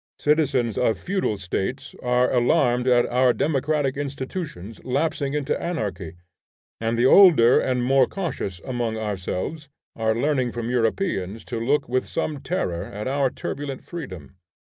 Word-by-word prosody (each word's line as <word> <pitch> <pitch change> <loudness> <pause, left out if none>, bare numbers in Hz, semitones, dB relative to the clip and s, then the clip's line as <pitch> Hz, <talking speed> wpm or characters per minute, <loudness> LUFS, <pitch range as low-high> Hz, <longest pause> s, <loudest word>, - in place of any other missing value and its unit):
Citizens 140 -7 +1
of 115 -3 +2
feudal 185 - -1
states 100 +9 -4
are 125 +1 +2
alarmed 125 -1 +2
at 120 -1 +4
our 125 0 +3
democratic 145 -1 0
institutions 140 - -6
lapsing 145 +2 -1
into 145 -2 0
anarchy, 100 - -3 0.7
and 115 +1 -1
the 120 - +3
older 140 -8 +7
and 125 -1 0
more 130 0 +4
cautious 140 - -4
among 120 -3 -2
ourselves 105 - -4 0.3
are 110 -1 0
learning 130 -1 +1
from 120 0 -4
Europeans 115 - -1
to 120 -3 -4
look 135 +6 +1
with 130 +1 -1
some 155 -3 -3
terror 90 - -2
at 105 +2 -6
our 135 0 +1
turbulent 140 +1 -5
freedom. 95 - -8
125 Hz, 140 wpm, -24 LUFS, 115-145 Hz, 0.7 s, older